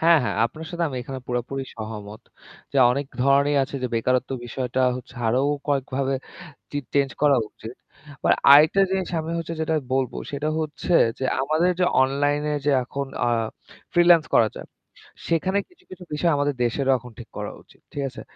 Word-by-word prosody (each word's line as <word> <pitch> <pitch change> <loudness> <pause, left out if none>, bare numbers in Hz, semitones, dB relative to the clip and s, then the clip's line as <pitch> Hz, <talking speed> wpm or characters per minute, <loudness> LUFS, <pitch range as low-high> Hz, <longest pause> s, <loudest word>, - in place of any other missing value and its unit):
হ্যাঁ, 165 0 +6
হ্যাঁ - - -2
আপনার 155 +7 -5
সাথে 170 -1 -1
আমি 130 - -6
এখানে 130 +1 -7
পুরোপুরি 125 +2 -3
সহমত। 110 -1 -7 0.5
যে - - -2
অনেক 140 +3 -1 0.2
ধরনেরই 140 +2 +3
আছে 140 +1 -4
যে 125 - +1
বেকারত্ব 125 +2 +1
বিষয়টা 125 +1 -3 0.2
হচ্ছে 125 +1 -11
আরো 120 +3 +2 0.3
কয়েকভাবে 135 -1 0 0.6
চি 145 - -2 0.2
চেঞ্জ 140 -1 +2
করা 145 -2 +5
উচিত। 110 +2 -10 0.5
মানে - - +4 0.2
আরেকটা 155 +7 +7
জিনিস 190 -1 -1
আমি 160 +1 -5
হচ্ছে 165 0 -4
যেটা 160 0 0 0.2
বলবো 130 -1 0
সেটা 145 +2 -2
হচ্ছে 155 +3 -3 0.3
যে 130 - -3 0.2
আমাদের 155 +6 +2
যে 180 - +5 0.2
অনলাইনে 145 +2 0
যে - - +4
এখন 140 +2 -4 0.2
আ - - +3 0.6
ফ্রিল্যান্স 175 -2 +6
করা 110 - +5
যায়, - - -8 0.6
সেখানে 185 +4 +1
কিছু, 370 +1 -26
কিছু 185 -1 -10
বিষয় 165 +3 +2
আমাদের 145 0 0
দেশেরও 135 +3 +1
এখন 125 0 -13
ঠিক - - -10
করা - - -4
উচিত। - - -24
ঠিক 145 - -3
আছে? 125 - -10
140 Hz, 175 wpm, -24 LUFS, 130-160 Hz, 0.6 s, আরেকটা